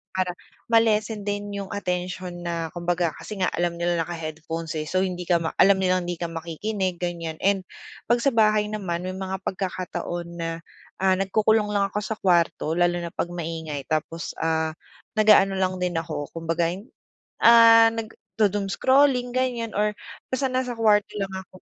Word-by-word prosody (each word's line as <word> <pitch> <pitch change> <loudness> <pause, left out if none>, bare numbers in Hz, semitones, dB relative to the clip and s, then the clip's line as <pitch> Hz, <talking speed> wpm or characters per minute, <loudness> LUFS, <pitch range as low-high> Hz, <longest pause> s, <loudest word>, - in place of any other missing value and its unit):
Para 180 -1 -1 0.3
ma-lessen 220 -2 +2
din 205 0 -3
yung 195 -1 -5
atensyon 180 -2 -4
na, 170 -1 -2
kumbaga, 175 -1 0
kasi 210 -2 -8
nga 185 - +2
alam 170 0 -1
nila 170 -1 +1
naka-headphones 160 0 -5
eh. 155 - -1
So, 185 +5 -1
hindi 180 -1 -1
ka 170 -1 +2
ma 160 - -3
alam 195 0 +5
nilang 185 -1 +2
hindi 175 -1 -4
ka 170 - -2
makikinig, 175 +3 -3
ganiyan. 170 -3 -4
And 195 -1 +2 0.5
'pag 240 - +4
sa 270 0 +1
bahay 215 -1 +4
naman 185 -4 -3
may 185 - -4
mga 190 0 -4
pagkakataon 185 -2 -4
na, 165 -1 -3 0.5
ah, 190 -1 +3
nagkukulong 210 +2 +2
lang 200 -1 +2
ako 205 +2 -3
sa 220 - -3
kwarto 170 -3 +2
lalo 175 0 +2
na 170 -1 -5
'pag 175 - -2
maingay. 160 -4 -5
Tapos, 165 +1 -3
ah, 160 -1 -1 0.4
nag-aano 210 -2 +5
lang 185 -1 0
din 180 -1 -1
ako 155 -3 -3
kumbaga 165 0 0
ay, 185 +4 -5 0.6
ah, 230 -1 +8
nagdo-doom 210 -3 -2
scrolling 260 -2 +3
ganiyan 240 -4 -1
or 210 0 +2 0.4
basta 260 +1 +1
nasa 255 -1 -1
kuwarto 215 -3 +3
lang 195 -1 -2
ako, 190 -1 -9
185 Hz, 165 wpm, -24 LUFS, 170-210 Hz, 0.6 s, ah